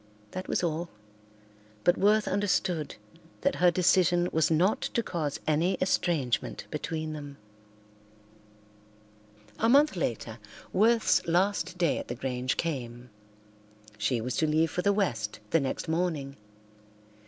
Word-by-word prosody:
That 185 - -6
was - - -1
all, 170 0 -2 0.9
but 175 - +4
Worth 210 +2 +3
understood 185 -5 0 0.5
that 280 - +1
her 180 0 +5
decision 175 0 +3
was 160 0 +2
not 175 +6 +2
to 235 - -1
cause 155 -8 -3
any 165 +5 +2
estrangement 155 - 0
between 155 +1 -3
them. 145 -2 -8 2.2
A 225 - +3
month 285 -1 +5
later 115 - -3 0.3
Worth's 225 +4 +3
last 185 +1 +1
day 170 -4 +1
at - - -7
the 120 - -4
Grange 125 0 -2
came. 125 -6 -4 0.9
She 115 +3 +1
was 125 +2 -3
to 155 - +2
leave 155 +1 +2
for 180 - -1
the 200 - +3
West 120 - -1
the 165 - +4
next 135 +4 -3
morning. 160 -5 -1
165 Hz, 130 wpm, -28 LUFS, 140-185 Hz, 2.2 s, her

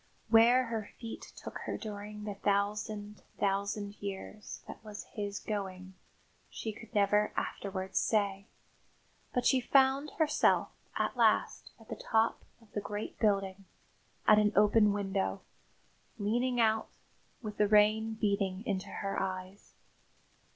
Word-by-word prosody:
II - - -36
Where 240 +3 +7
her 225 -3 -4
feet 230 -2 -7
took - - -7
her - - -2
during 210 -1 -7
the 210 -1 -3
thousand, 205 +1 -1 0.2
thousand 200 +1 -1
years 200 +1 -6
that - - -9
was 210 -1 -7
his 205 -1 -5
going 190 -3 -5 0.6
she 220 - -5
could 220 +1 -13
never 210 +1 +3
afterwards 190 -1 -2
say; 200 -2 0 0.8
but 250 -1 0
she 260 -2 +4
found 270 +3 +4
herself 310 -2 +3 0.3
at - - 0
last - - +2
at - - -17
the - - -5
top 225 0 +1 0.2
of 225 -3 -22
the 205 - -2
great 205 +1 -5
building, 195 -2 +1 0.6
at 215 0 +8
an 210 -1 +3
open 210 +1 +5
window, 195 -1 -1 0.8
leaning 240 +4 0
out, 220 -1 +2 0.5
with 210 -1 -5
the 210 - +4
rain 215 +1 +4
beating 200 -2 0
into 195 -4 -2
her 195 -1 -3
eyes. 185 +1 -5
210 Hz, 135 wpm, -32 LUFS, 200-220 Hz, 0.8 s, at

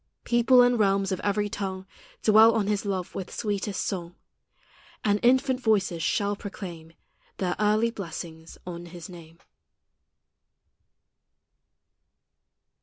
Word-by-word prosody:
People 245 +1 +5
and 245 -1 +3
realms 195 -1 +2
of 185 - -1
every 205 0 0
tongue 190 -2 -5 0.4
Dwell 220 +1 +6
on 215 -3 +1
His 205 0 -1
love 190 -3 -3
with 185 - -5
sweetest 205 -2 -2
song, 175 -3 -4 0.9
And 205 0 +2
infant 260 +1 +3
voices 200 -8 +1
shall 205 +4 0
proclaim 175 -5 -8 0.4
Their 180 -2 -1
early 215 +2 +2
blessings 165 -5 -8
on 175 -1 -7
His 170 0 -10
name. 165 -2 -13
200 Hz, 110 wpm, -26 LUFS, 180-215 Hz, 0.9 s, Dwell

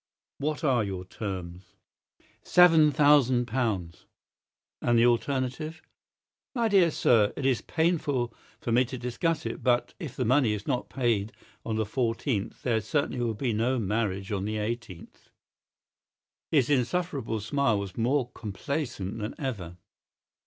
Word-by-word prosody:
"What 150 +3 -2
are 130 -6 +3
your 95 -2 -5
terms?" 95 -2 -7 0.7
"Seven 165 -4 +6
thousand 130 -4 +4
pounds." 105 -8 -2 0.7
"And 120 -1 +2
the 115 - +5
alternative?" 130 +6 0 0.8
"My 235 -2 +2
dear 190 -4 +5
sir, 110 -8 +3
it 140 - -3
is 130 -3 +2
painful 150 -8 0 0.3
for 120 - -3
me 120 +2 +5
to 130 +2 -6
discuss 135 +7 -1
it; - - -4
but 125 -1 +2
if 160 -9 -6
the 125 - -1
money 125 -2 +3
is 105 -1 -5
not 125 - -2
paid 115 -5 0 0.3
on 110 - -2
the 110 0 0
14th 115 -1 -2
there 115 -3 +1
certainly 130 +3 -1
will 115 -2 -1
be 120 +1 -1
no 120 +5 +1
marriage 105 -2 -1
on 100 -1 -1
the 110 +1 -2
18th." 105 -4 -6 1.2
His 140 -6 +3
insufferable 135 -4 0
smile 115 0 +1
was 100 -2 -5
more 125 +2 0
complacent 115 -1 -4
than 105 +1 -4
ever. 95 - -5
120 Hz, 140 wpm, -28 LUFS, 105-140 Hz, 1.2 s, Seven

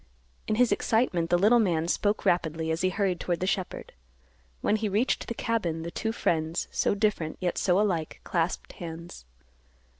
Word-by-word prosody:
In 215 - +1
his 245 0 +3
excitement 205 -6 +1
the 175 - +4
little 215 +6 +5
man 170 -6 +1
spoke 205 +4 0
rapidly 160 -2 +1
as 160 - -1
he 185 - +3
hurried 185 -2 0
toward 175 -2 -1
the 185 - -1
shepherd. 190 -1 -3 0.7
When 215 - +2
he 215 -1 -1
reached 215 +6 0
the 235 - -4
cabin, 175 -10 -1
the 170 - -5
two 220 - -2
friends, 165 -6 -1
so - - +1
different, 205 -7 0
yet 180 -1 -1
so 180 0 +3
alike, 175 -7 -1
clasped 170 0 -1
hands. 170 - -8
180 Hz, 175 wpm, -28 LUFS, 165-210 Hz, 0.7 s, little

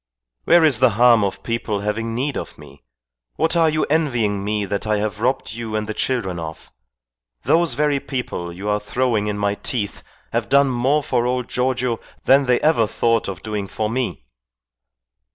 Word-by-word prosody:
Where 170 -1 +6
is 145 -7 +4
the 130 -1 +5
harm 120 -3 +6
of 100 - -3
people 115 -3 -2
having 115 +2 -2
need 135 +3 -1
of - - -6
me? - - -15 0.5
What 160 +1 +1
are 165 -1 +4
you 155 0 0
envying 120 -10 0
me 105 0 -1
that 100 +2 -3
I 105 -1 +2
have 105 0 -3
robbed 125 -1 -1
you 115 -1 -5
and 110 0 -1
the 110 - -4
children 105 -8 -2
of? 80 -1 -8 0.7
Those 165 -5 +2
very 145 0 +1
people 125 -11 -4
you 95 +4 -7
are 105 0 +1
throwing 110 -1 0
in 105 -1 -2
my 100 0 0
teeth 105 0 -3 0.3
have - - -1
done 140 0 +5
more 135 +5 +1
for 120 -2 0
old 125 -1 -1
Giorgio 125 -2 0 0.3
than 135 0 +5
they 125 -1 +3
ever 150 -8 +3
thought 115 +1 +1
of 95 -4 -6
doing 105 -2 -3
for 110 +2 -3
me." 120 - -3
115 Hz, 185 wpm, -21 LUFS, 105-130 Hz, 0.7 s, Where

